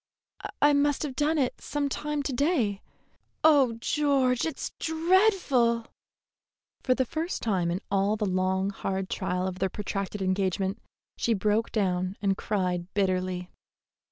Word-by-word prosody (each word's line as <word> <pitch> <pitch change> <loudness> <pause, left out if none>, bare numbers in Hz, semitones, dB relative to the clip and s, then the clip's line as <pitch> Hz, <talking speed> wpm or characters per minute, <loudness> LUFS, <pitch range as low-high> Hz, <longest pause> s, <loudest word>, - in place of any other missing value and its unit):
"I 290 0 +6
must 285 0 +2
have 280 -4 -4
done 300 +4 +1
it 260 -4 -1
some 290 -1 -2
time 295 +1 -2
to 275 - -2
day. 245 - +1 0.6
Oh, 285 -6 +5
George, 260 +1 +1
it's 320 - -4
dreadful!" 320 - +2 1.0
For 255 - +2
the 260 - +1
first 320 +8 -3
time 185 -6 +1
in 175 +3 -2
all 200 +2 +2
the 215 -1 -1
long, 190 +1 0
hard 190 -1 -3
trial 185 -1 -1
of 185 0 -5
their 190 - +1
protracted 200 +1 -4
engagement, 190 +2 0 0.4
she 230 - +1
broke 210 +3 +1
down 185 -2 0
and 195 -1 +1
cried 180 -3 -2
bitterly. 185 -2 -1
215 Hz, 140 wpm, -27 LUFS, 190-285 Hz, 1.0 s, I